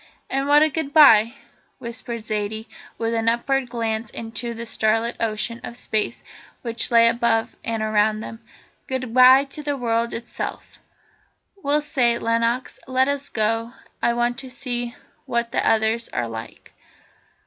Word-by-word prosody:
"And 270 Hz, +1 st, 0 dB
what 295 Hz, +1 st, +6 dB
a 310 Hz, -, +3 dB
goodbye," 275 Hz, -7 st, +5 dB, 0.4 s
whispered 235 Hz, -1 st, -5 dB
Zaidie, 215 Hz, +1 st, -3 dB, 0.3 s
with 230 Hz, 0 st, -1 dB
an 225 Hz, 0 st, +2 dB
upward 255 Hz, +2 st, 0 dB
glance 225 Hz, -2 st, -2 dB
into 230 Hz, +1 st, -5 dB
the 230 Hz, +1 st, -6 dB
starlit 225 Hz, +1 st, 0 dB
ocean 230 Hz, +1 st, -2 dB
of 235 Hz, -, -7 dB
Space 215 Hz, -3 st, -2 dB, 0.4 s
which 235 Hz, -1 st, -2 dB
lay 230 Hz, -1 st, +6 dB
above 230 Hz, -1 st, +1 dB
and 225 Hz, -1 st, -2 dB
around 215 Hz, 0 st, +2 dB
them. 225 Hz, 0 st, -9 dB, 0.4 s
"Goodbye 255 Hz, +1 st, +5 dB
to 300 Hz, -, -6 dB
the 290 Hz, -1 st, -2 dB
world 235 Hz, -1 st, 0 dB
itself! 235 Hz, +1 st, -6 dB, 0.8 s
Well, 300 Hz, -6 st, 0 dB
say 255 Hz, -5 st, +2 dB
it, -, -, -6 dB
Lenox, 230 Hz, +2 st, 0 dB
and 260 Hz, -, -8 dB
let 260 Hz, +1 st, +4 dB
us 285 Hz, 0 st, -2 dB
go; 225 Hz, +2 st, 0 dB, 0.3 s
I 235 Hz, -, +2 dB
want 240 Hz, 0 st, 0 dB
to 260 Hz, -, -7 dB
see 245 Hz, -2 st, -4 dB, 0.3 s
what 235 Hz, -2 st, -1 dB
the -, -, 0 dB
others 220 Hz, +1 st, +1 dB
are 120 Hz, -, -2 dB
like." 115 Hz, 0 st, -9 dB
235 Hz, 150 wpm, -22 LUFS, 225-255 Hz, 0.8 s, what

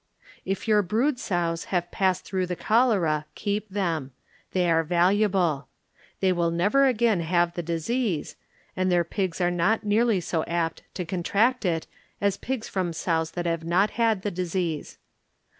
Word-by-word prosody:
If 195 Hz, +3 st, -3 dB
your 210 Hz, -1 st, +5 dB
brood 240 Hz, +8 st, 0 dB
sows 170 Hz, -6 st, -1 dB
have 175 Hz, -2 st, -2 dB
passed 185 Hz, -2 st, 0 dB
through 185 Hz, -1 st, -1 dB
the 180 Hz, -, -2 dB
cholera, 190 Hz, -10 st, +2 dB
keep 210 Hz, 0 st, -2 dB
them; 165 Hz, -9 st, -2 dB, 0.4 s
they 180 Hz, -1 st, +1 dB
are 165 Hz, -1 st, +3 dB
valuable. 180 Hz, -2 st, +2 dB, 0.5 s
They 190 Hz, -1 st, +3 dB
will 170 Hz, -1 st, +1 dB
never 205 Hz, +12 st, +3 dB
again 235 Hz, -5 st, +2 dB
have 170 Hz, +1 st, +1 dB
the 175 Hz, -, -3 dB
disease, 170 Hz, -, -2 dB, 0.4 s
and 185 Hz, 0 st, +1 dB
their 175 Hz, -1 st, +3 dB
pigs 185 Hz, +1 st, -3 dB
are 175 Hz, -1 st, +2 dB
not 195 Hz, +6 st, +1 dB
nearly 215 Hz, 0 st, +2 dB
so 165 Hz, -2 st, -1 dB
apt 170 Hz, -1 st, -2 dB
to 180 Hz, -, -3 dB
contract 205 Hz, +8 st, +1 dB
it 165 Hz, -3 st, 0 dB, 0.3 s
as 200 Hz, -1 st, +1 dB
pigs 255 Hz, +1 st, -4 dB
from 180 Hz, -3 st, -2 dB
sows 160 Hz, -1 st, -1 dB
that 175 Hz, -1 st, -3 dB
have 165 Hz, -1 st, -1 dB
not 180 Hz, +5 st, +2 dB
had 225 Hz, -4 st, +1 dB
the 205 Hz, -, -1 dB
disease. 175 Hz, -3 st, -3 dB
180 Hz, 160 wpm, -26 LUFS, 170-210 Hz, 0.5 s, your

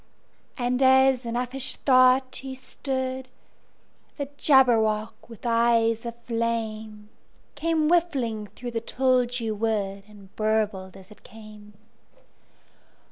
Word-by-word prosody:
And 250 Hz, 0 st, -1 dB
as 265 Hz, -1 st, +4 dB
in 230 Hz, -, -3 dB
uffish 250 Hz, +2 st, -3 dB
thought 255 Hz, 0 st, +3 dB
he 265 Hz, 0 st, -7 dB
stood, 260 Hz, 0 st, -4 dB, 0.9 s
The 285 Hz, -2 st, -4 dB
Jabberwock, 225 Hz, -6 st, +2 dB
with 230 Hz, 0 st, -13 dB
eyes 230 Hz, -1 st, +2 dB
of 235 Hz, -, -6 dB
flame, 220 Hz, -2 st, -3 dB, 0.4 s
Came 315 Hz, +1 st, 0 dB
whiffling 270 Hz, -11 st, 0 dB
through 245 Hz, -1 st, -6 dB
the 230 Hz, -1 st, -3 dB
tulgey 250 Hz, -2 st, 0 dB
wood, 205 Hz, -2 st, -2 dB
And 200 Hz, -2 st, -17 dB
burbled 210 Hz, -3 st, -1 dB
as 190 Hz, +1 st, -15 dB
it 210 Hz, -, -16 dB
came! 215 Hz, -1 st, -14 dB
235 Hz, 110 wpm, -25 LUFS, 215-260 Hz, 0.9 s, as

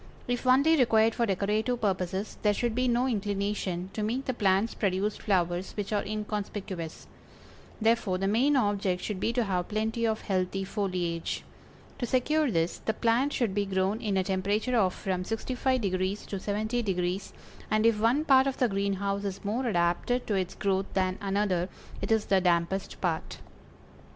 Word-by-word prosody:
If 245 Hz, +1 st, -2 dB
only 280 Hz, +6 st, +5 dB
required 225 Hz, -3 st, +4 dB
for 235 Hz, 0 st, 0 dB
decorative 210 Hz, +5 st, 0 dB
purposes 190 Hz, -1 st, -2 dB
there 210 Hz, -1 st, +3 dB
should 240 Hz, +1 st, 0 dB
be 255 Hz, +2 st, +1 dB
no 245 Hz, +1 st, +2 dB
inclination 200 Hz, -4 st, -2 dB
to 215 Hz, -, -3 dB
make 240 Hz, +6 st, -1 dB
the 260 Hz, -, -1 dB
plants 200 Hz, 0 st, +2 dB
produce 200 Hz, +1 st, 0 dB
flowers 180 Hz, -2 st, 0 dB
which 205 Hz, 0 st, -3 dB
are 205 Hz, -, +1 dB
inconspicuous; 205 Hz, -5 st, -4 dB, 0.7 s
therefore 220 Hz, -4 st, +2 dB
the 195 Hz, +1 st, -1 dB
main 250 Hz, +8 st, +3 dB
object 200 Hz, -6 st, +1 dB
should 210 Hz, -3 st, -3 dB
be 225 Hz, -, +1 dB
to 240 Hz, 0 st, +2 dB
have 180 Hz, -4 st, -1 dB
plenty 220 Hz, +2 st, -1 dB
of 220 Hz, 0 st, -1 dB
healthy 190 Hz, 0 st, -1 dB
foliage. 180 Hz, -4 st, -2 dB, 0.6 s
To 245 Hz, -, -1 dB
secure 295 Hz, +5 st, +2 dB
this, 165 Hz, -4 st, 0 dB
the 220 Hz, -, -2 dB
plant 240 Hz, +6 st, +2 dB
should 235 Hz, -8 st, 0 dB
be 200 Hz, 0 st, 0 dB
grown 190 Hz, +3 st, 0 dB
in 205 Hz, -4 st, 0 dB
a 190 Hz, -, +2 dB
temperature 200 Hz, +6 st, 0 dB
of 190 Hz, -5 st, +2 dB
from 185 Hz, -2 st, -2 dB
65° 215 Hz, -4 st, -1 dB
to -, -, -5 dB
70°, 200 Hz, -3 st, -1 dB, 0.4 s
and 215 Hz, +1 st, +2 dB
if 230 Hz, -2 st, +4 dB
one 245 Hz, +8 st, +2 dB
part 265 Hz, -2 st, +6 dB
of 270 Hz, -, -2 dB
the 250 Hz, -, +3 dB
greenhouse 200 Hz, 0 st, -1 dB
is 200 Hz, 0 st, -5 dB
more 240 Hz, +5 st, -1 dB
adapted 175 Hz, +6 st, +1 dB
to 215 Hz, -, -1 dB
its 185 Hz, -2 st, -1 dB
growth 195 Hz, -1 st, 0 dB
than 185 Hz, 0 st, 0 dB
another, 195 Hz, -3 st, 0 dB, 0.3 s
it -, -, -2 dB
is 220 Hz, -1 st, +3 dB
the 190 Hz, -1 st, +3 dB
dampest 180 Hz, +2 st, 0 dB
part. 165 Hz, -4 st, -2 dB
205 Hz, 170 wpm, -28 LUFS, 190-230 Hz, 0.7 s, part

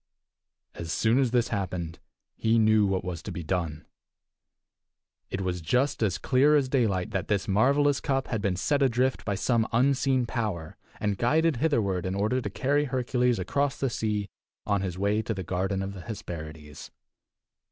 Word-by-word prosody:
As 85 Hz, -1 st, -6 dB
soon 110 Hz, +9 st, +2 dB
as 130 Hz, -3 st, +3 dB
this 120 Hz, 0 st, +1 dB
happened 90 Hz, -4 st, -3 dB, 0.4 s
he 115 Hz, +1 st, +2 dB
knew 110 Hz, -2 st, +4 dB
what 95 Hz, -1 st, -1 dB
was 85 Hz, -3 st, -4 dB
to -, -, -7 dB
be 85 Hz, -, -5 dB
done. 80 Hz, -3 st, -2 dB, 1.4 s
It 95 Hz, -, -3 dB
was 90 Hz, -2 st, -2 dB
just 125 Hz, -, +1 dB
as 100 Hz, -5 st, +1 dB
clear 140 Hz, +3 st, +3 dB
as 140 Hz, -3 st, +3 dB
daylight 110 Hz, -9 st, 0 dB
that 95 Hz, -, -2 dB
this 100 Hz, -2 st, 0 dB
marvelous 140 Hz, +8 st, +3 dB
cup 135 Hz, -2 st, 0 dB
had 110 Hz, -3 st, -1 dB
been 95 Hz, -2 st, 0 dB
set 145 Hz, +10 st, 0 dB
adrift 130 Hz, 0 st, +1 dB
by 100 Hz, -, -1 dB
some 115 Hz, +3 st, +1 dB
unseen 130 Hz, +1 st, +2 dB
power, 105 Hz, -10 st, -3 dB, 0.2 s
and 105 Hz, -2 st, -1 dB
guided 155 Hz, +4 st, +2 dB
hitherward 105 Hz, -, +1 dB
in 95 Hz, -, -2 dB
order 110 Hz, +6 st, +1 dB
to 105 Hz, -, -3 dB
carry 145 Hz, +8 st, +1 dB
Hercules 125 Hz, -2 st, +1 dB
across 140 Hz, +9 st, -1 dB
the 135 Hz, -3 st, 0 dB
sea 105 Hz, -3 st, -1 dB, 0.4 s
on 100 Hz, -2 st, +1 dB
his 90 Hz, -2 st, -3 dB
way 100 Hz, +3 st, +1 dB
to 110 Hz, 0 st, -3 dB
the 95 Hz, -, -4 dB
garden 95 Hz, +2 st, -1 dB
of 95 Hz, +1 st, -5 dB
the 95 Hz, -, -8 dB
Hesperides. 80 Hz, -7 st, -8 dB
110 Hz, 175 wpm, -27 LUFS, 95-130 Hz, 1.4 s, knew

